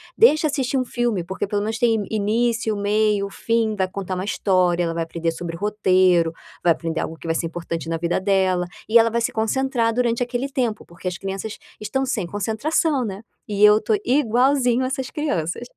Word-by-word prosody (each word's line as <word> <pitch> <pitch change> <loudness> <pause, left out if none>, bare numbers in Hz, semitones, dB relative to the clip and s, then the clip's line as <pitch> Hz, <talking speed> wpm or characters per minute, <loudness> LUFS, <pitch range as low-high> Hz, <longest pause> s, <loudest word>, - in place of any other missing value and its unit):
Deixa 310 -8 +5
assistir 275 -3 0
um 255 - 0
filme 240 -7 -1
porque 190 +3 -4
pelo 205 0 -1
menos 220 +1 -3
tem 225 -3 +2
início, 220 +1 0
meio, 205 0 +1
fim, 225 0 0
vai 190 -2 0
contar 190 0 -5
uma 185 - -3
história, 185 -4 +1
ela 165 -1 -1
vai 165 0 -1
aprender 165 0 -2
sobre 165 0 -6
roteiro, 185 -4 +3 0.3
vai 175 - +5
aprender 165 0 -2
algo 165 - -4
que - - -14
vai 165 - 0
ser 165 - -1
importante 165 -1 -5
na 165 - -1
vida 170 +1 0
dela, 190 -2 +1 0.2
e 230 +2 +6
ela 230 0 +4
vai 235 +1 -1
se 230 - 0
concentrar 230 +1 0
durante 235 0 0
aquele 245 +2 -2
tempo.", 240 -5 -2
porque 170 +2 -9
as 180 0 -2
crianças 195 +2 -5 0.2
estão 265 +5 -1
sem 220 -9 -2
concentração, 250 - 0
né, 200 -1 -6 0.3
e 205 0 0
eu 210 +1 +6
tô 215 0 +1
igualzinho 250 0 +2
essas 265 0 -3
crianças. 235 - -2
210 Hz, 195 wpm, -22 LUFS, 185-240 Hz, 0.3 s, e